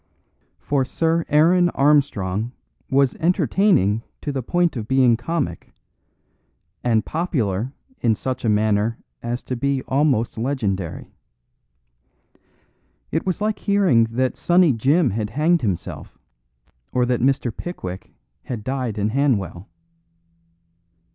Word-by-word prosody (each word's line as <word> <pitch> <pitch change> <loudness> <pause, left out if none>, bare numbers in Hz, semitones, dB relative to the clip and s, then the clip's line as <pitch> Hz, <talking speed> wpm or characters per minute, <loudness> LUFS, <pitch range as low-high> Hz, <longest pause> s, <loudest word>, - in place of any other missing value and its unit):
For 140 -2 0
Sir 165 +5 0
Aaron 175 +4 +4
Armstrong 120 -7 +1 0.4
was 135 -1 +3
entertaining 170 - +2 0.2
to 145 - -3
the 135 -2 -2
point 175 +6 +1
of 110 -3 -4
being 130 -2 +4
comic; 120 - -3 1.1
and 115 -3 +2
popular 125 - -1 0.3
in 115 -2 +2
such 130 +4 -4
a 115 - +1
manner 105 +1 +1 0.2
as 120 +1 -4
to 130 - -4
be 135 +1 -1
almost 130 -5 +1
legendary. 105 - -3 2.0
It - - -1
was 185 +2 -1
like 210 -1 0
hearing 195 - +3
that 125 +3 -1
Sunny 175 -4 +3
Jim 135 +5 +2
had 105 +1 -2
hanged 160 +8 +2
himself; 100 -8 -4 0.7
or 125 -1 +2
that 125 -1 0
Mr. 130 -2 +1
Pickwick 95 - -7 0.3
had 120 -5 -5
died 130 -3 -3
in 105 +1 0
Hanwell. 105 -9 -1
130 Hz, 115 wpm, -22 LUFS, 110-150 Hz, 2.0 s, Aaron